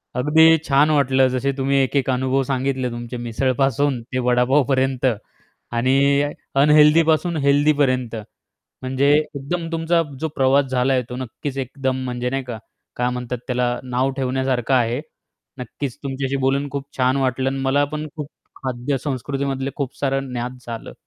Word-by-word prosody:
अगदी 160 +5 +5
छान 145 +1 +4
वाटलं. 135 -3 +3
जसे 130 +2 0
तुम्ही 135 +1 0
एक-एक 135 +1 0
अनुभव 130 +1 +1
सांगितले 130 -1 -1
तुमचे 120 +1 -6
मिसळपासून 135 +2 0
ते 130 +2 -4
वडापावपर्यंत. 130 +1 +2 0.7
आणि 140 +4 +3 0.3
अनहेल्दीपासून 155 +3 +4
हेल्दीपर्यंत. 140 -4 +2 0.7
म्हणजे 130 +2 +1
एकदम 155 +3 -4
तुमचा 165 +1 +1 0.2
जो 160 - -1
प्रवास 135 +1 +3
झाला 130 +1 +1
आहे, 130 -1 +2
तो 125 - -6
नक्कीच 130 +2 -6
एकदम 130 0 -2
म्हणजे 125 -1 -3
नाही 135 +1 -2
का, 120 -3 -6 0.4
काय 125 0 0
म्हणतात 125 0 -4
त्याला 125 -1 0
नाव 130 +1 0
ठेवण्यासारखं 130 -1 0
आहे. 120 0 +1 0.6
नक्कीच 125 +2 -5
तुमच्याशी 135 0 -2
बोलून 140 +2 +1
खूप 140 0 -5
छान 130 0 +2
वाटलं 130 -1 0
आणि 135 - -3
मला 135 +2 +2
पण 155 0 -3
खूप 150 -2 -5 0.3
खाद्य 130 +1 -3
संस्कृतीमधले 135 0 -3
खूप 140 -3 -3
सारं 135 -1 -1
ज्ञात 125 +1 -4
झालं, 115 -1 -7
135 Hz, 140 wpm, -21 LUFS, 125-140 Hz, 0.7 s, अगदी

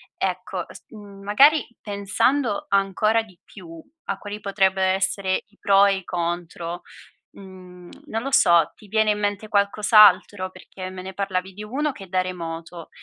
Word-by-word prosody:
Ecco, - - -3
s - - -13
mhmm, 205 -3 -13
magari, 275 +10 +4
pensando 205 +4 0
ancora 200 +3 +2
di 185 -5 -19
più 165 -4 -13 0.2
a 200 - -3
quali 205 +1 -7
potrebbero 190 -2 +1
essere 190 0 -1
i 205 0 -30
pro 200 0 +4
e 200 -1 +2
i 190 - -9
contro, 175 0 -4 0.5
mhmm, 185 -2 -13 0.2
non 225 +1 -3
lo 275 - -4
so, 170 - +4
ti 210 - -18
viene 215 +1 +2
in 210 - -4
mente 205 +1 -2
qualcos'altro? 205 -1 +4
Perché 185 0 -9
me 185 -1 -8
ne 190 0 -8
parlavi 190 -1 -3
di 210 +3 -9
uno 280 +7 -2
che 200 - -13
è - - -13
da 185 0 +1
remoto 170 -2 -6
195 Hz, 165 wpm, -23 LUFS, 185-210 Hz, 0.5 s, magari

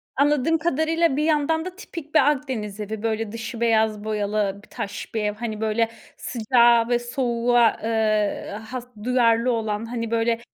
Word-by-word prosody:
Anladığım 290 +3 +2
kadarıyla, 325 -1 +1
bir 300 - 0
yandan 320 +1 +1
da 365 0 -6
tipik 320 -5 -9
bir 285 -1 +6
Akdeniz 240 -8 -4
evi, 215 +1 -5
böyle, 225 -1 -1
dışı 230 +1 -6
beyaz 220 -2 +2
boyalı 210 -2 -1
bir - - -19
taş 200 - -6
bir 220 - 0
ev, 210 0 0
hani 220 -1 -5
böyle 220 +1 +1 0.3
sıcağa 235 0 +3
ve 240 -1 +2
soğuğa, 240 -1 +2
ııı, 215 -2 0
has 240 +3 -7 0.2
duyarlı 240 0 +3
olan, 220 -2 -2
hani, 230 -1 -4
böyle, 230 0 +1
230 Hz, 160 wpm, -23 LUFS, 220-260 Hz, 0.3 s, bir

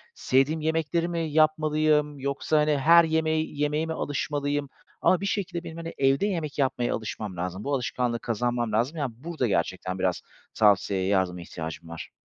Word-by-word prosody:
Sevdiğim 140 +5 +2
yemekleri 160 +1 0
mi 170 -1 -2
yapmalıyım? 155 -1 +2
Yoksa 140 +3 0
hani, 150 -1 +2
her 170 +5 +7
yemeği 160 -2 0
yemeğe 150 +2 +1
mi 160 - -3
alışmalıyım? 145 -1 -2 0.3
Ama 185 0 +3
bir - - -2
şekilde 190 -4 -2
benim 165 -1 -8
hani, 165 0 -6
evde 135 +6 +3
yemek 165 -7 -3
yapmaya 125 -3 +1
alışmam 105 -4 -5
lazım. 90 +3 -4
Bu 145 - -2
alışkanlığı 125 -2 -1
kazanmam 120 0 -1
lazım, 120 +9 0
yani, 140 -6 -2
burada 155 -2 -2
gerçekten 95 0 -1
biraz 90 -2 0 0.3
tavsiyeye, 100 -3 +3
yardıma 95 -3 +1
ihtiyacım 80 -1 -7
var. 85 - -8
145 Hz, 160 wpm, -26 LUFS, 110-160 Hz, 0.3 s, her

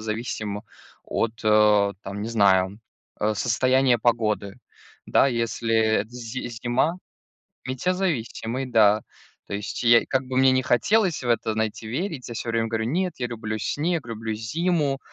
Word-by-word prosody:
зависим 110 -1 -4 0.4
от, 115 - -1
э, 105 -1 +4
там, 100 +1 -6
не 110 - -3
знаю, 100 -2 +2 0.4
э, 105 +1 +1
состояния 130 +3 +2
погоды. 110 -4 0 0.5
Да, - - +4
если 115 -2 -1
это 110 -1 +2
зи 120 +1 -6
зима 120 +7 0 0.7
Метеозависимый, 130 -5 -2
да. 110 -3 +4 0.4
То - - -6
есть 100 0 -4
я, 120 0 +6
как 130 0 0
бы 130 0 -4
мне 130 0 +5
ни 130 0 +2
хотелось 180 - +2
в 125 - -4
это, 115 -2 +1
знаете, 110 0 -2
верить, 150 - -3
я 120 - -6
всё 115 - -5
время 115 0 0
говорю: 110 -1 -1
"Нет, 180 +8 -1
я 125 - -1
люблю 110 -2 -4
снег, 160 - -1
люблю 110 -1 -4
зиму". 145 +5 0
115 Hz, 150 wpm, -24 LUFS, 110-130 Hz, 0.7 s, я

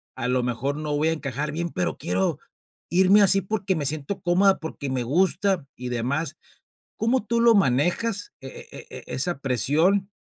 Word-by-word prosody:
a 120 - -3
lo 125 0 +1
mejor 125 +3 -2
no 150 -1 -3
voy 155 +2 +2
a - - +1
encajar 145 -1 -3
bien, 170 +2 -2
pero, 90 - -2
quiero 95 +2 -1 0.5
irme 190 +4 +5
así 195 0 +6
porque 195 -1 -2
me 145 - -2
siento 155 +6 -2
cómoda, 190 +3 +3
porque 155 -3 -6
me 130 -2 -1
gusta 185 - +1
y 125 0 -5
demás", 135 +6 -2 0.6
¿cómo 235 +1 +1
tú 235 +2 0
lo 235 0 +6
manejas 195 - +1
e 135 - -8 0.2
e - - -9
e - - -9
e - - -4
esa 145 +3 -1
presión, 160 - +1
160 Hz, 180 wpm, -24 LUFS, 135-195 Hz, 0.6 s, así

